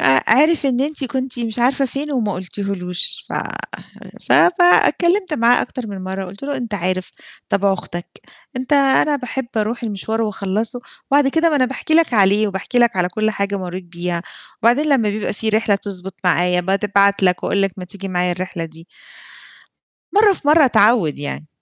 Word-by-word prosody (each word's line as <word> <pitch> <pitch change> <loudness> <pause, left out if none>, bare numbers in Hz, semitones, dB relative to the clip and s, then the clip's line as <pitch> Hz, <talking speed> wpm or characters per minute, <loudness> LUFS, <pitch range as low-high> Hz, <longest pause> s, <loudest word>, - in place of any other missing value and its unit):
ع 135 0 +4 0.2
عرف 310 -1 +3
إن 255 -2 0
أنتِ 285 0 -2
كنتِ 260 -1 -3
مش 230 -1 -4
عارفة 260 +3 +2
فين 285 +4 -5
وما 220 -7 -1
قُلتيهولوش 180 -1 -4
ف - - -9 1.0
ف - - +3 0.3
فاتكلّمت 355 +1 +3
معاه 240 -2 +4
أكتر 250 -1 -6
من 195 -3 -7
مرّة 190 +1 -4
وقُلت 195 +5 -11
له 280 0 -3
أنت 235 -5 -5
عارف 185 0 -2 0.4
طبع 200 0 +2
أختك، 175 -2 -6 0.5
أنت 255 +3 -4
أنا 285 +1 +4
باحب 260 0 -5
أروح 220 +3 -1
المشوار 220 +1 -3
وأخلّصه، 215 +3 -2 0.3
وبعد 280 0 +4
كده 325 +4 +2
ما 300 - +1
أنا 260 - +3
باحكي 270 +5 -3
لك 330 -6 +3
عليه 205 +1 +4
وباحكي 195 +5 -3
لك 235 -3 +3
على 180 -1 +1
كل 215 +4 -1
حاجة 200 -1 -2
مرّيت 180 0 -6
بيها 175 0 -4 0.4
وبعدين 245 +7 +3
لمّا 245 -7 +2
بيبقى 205 0 -2
في 220 +2 -4
رحلة 215 -1 +2
تضبط 190 -2 -6
معايا 180 0 +3
بتبعت 200 +1 +1
لك 180 -1 +2
وأقول 200 - +1
لك 195 -2 0
ما 185 - -7
تيجي 195 +1 -7
معايا 180 -1 0
الرحلة 180 -1 -5
دي. 165 +1 -11 1.3
مرّة 415 -1 +5
في 290 - -8
مرّة 305 0 +6
اتعوّد 210 - +3
يعني. 150 +1 -5
210 Hz, 180 wpm, -19 LUFS, 185-260 Hz, 1.3 s, مرّة